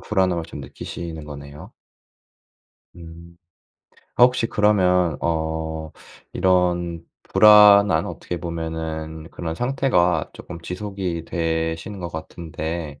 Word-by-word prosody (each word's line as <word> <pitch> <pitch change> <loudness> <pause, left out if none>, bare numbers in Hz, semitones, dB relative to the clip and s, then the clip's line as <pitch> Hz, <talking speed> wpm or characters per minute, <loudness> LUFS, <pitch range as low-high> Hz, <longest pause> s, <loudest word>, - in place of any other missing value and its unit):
불안함을 95 -4 0
좀 - - -9
느끼시는 80 -3 -7
거네요. 75 +6 -10 1.2
음. 85 0 -12 0.8
어 - - +3
혹시 125 -2 +2
그러면 90 -6 +2
어 80 -1 -2 0.4
이런 90 -2 +1 0.2
불안한 105 -2 +6
어떻게 90 - -6
보면은 80 -1 -5
그런 80 -2 -5
상태가 120 - +1
쪼끔 85 -1 -10
지속이 90 -2 -4
되시는 80 +3 -2
것 85 -2 -5
같은데 80 -2 -6
85 Hz, 220 characters per minute, -22 LUFS, 80-95 Hz, 1.2 s, 불안한